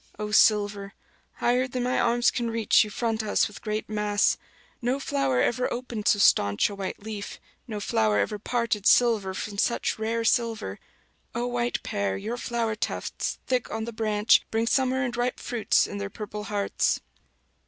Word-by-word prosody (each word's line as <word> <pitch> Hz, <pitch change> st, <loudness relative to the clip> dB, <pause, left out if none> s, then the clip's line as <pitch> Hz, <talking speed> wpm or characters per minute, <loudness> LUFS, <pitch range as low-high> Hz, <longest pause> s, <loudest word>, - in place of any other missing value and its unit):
O 210 Hz, 0 st, -4 dB
silver, 205 Hz, -2 st, +3 dB, 0.4 s
higher 250 Hz, +2 st, +1 dB
than 250 Hz, -1 st, -3 dB
my 250 Hz, +1 st, +1 dB
arms 240 Hz, 0 st, +3 dB
can 235 Hz, -1 st, -2 dB
reach 225 Hz, -1 st, +4 dB
you 210 Hz, -, -6 dB
front 225 Hz, +1 st, -1 dB
us 215 Hz, -1 st, +1 dB
with 205 Hz, -, -12 dB
great 215 Hz, -1 st, -3 dB
mass; 210 Hz, -1 st, +1 dB, 0.5 s
no 250 Hz, +3 st, 0 dB
flower 135 Hz, -, 0 dB
ever 250 Hz, +1 st, 0 dB
opened 240 Hz, -3 st, -4 dB
so -, -, +5 dB
staunch 100 Hz, -, +3 dB
a -, -, -6 dB
white 195 Hz, 0 st, -5 dB
leaf, 210 Hz, -2 st, -6 dB, 0.3 s
no 215 Hz, -3 st, -4 dB
flower 110 Hz, -, +1 dB
ever 205 Hz, -, 0 dB
parted 230 Hz, -2 st, -1 dB
silver 215 Hz, -6 st, +4 dB
from 200 Hz, +1 st, -5 dB
such 235 Hz, -, 0 dB
rare 225 Hz, +1 st, -1 dB
silver; 225 Hz, -, 0 dB, 0.6 s
O 240 Hz, +1 st, -1 dB
white 240 Hz, 0 st, -1 dB
pear, 100 Hz, -1 st, -1 dB
your 235 Hz, -, -4 dB
flower 235 Hz, -2 st, -1 dB
tufts, 215 Hz, -, -3 dB
thick 250 Hz, -2 st, -1 dB
on 220 Hz, 0 st, -3 dB
the 235 Hz, -, -6 dB
branch, 215 Hz, -1 st, +3 dB
bring 225 Hz, +1 st, 0 dB
summer 260 Hz, +2 st, +1 dB
and 245 Hz, -2 st, -2 dB
ripe 245 Hz, +1 st, -1 dB
fruits 235 Hz, -4 st, +1 dB
in 200 Hz, -, -6 dB
their 200 Hz, 0 st, -4 dB
purple 210 Hz, 0 st, -7 dB
hearts. 205 Hz, -1 st, 0 dB
220 Hz, 175 wpm, -26 LUFS, 205-240 Hz, 0.6 s, so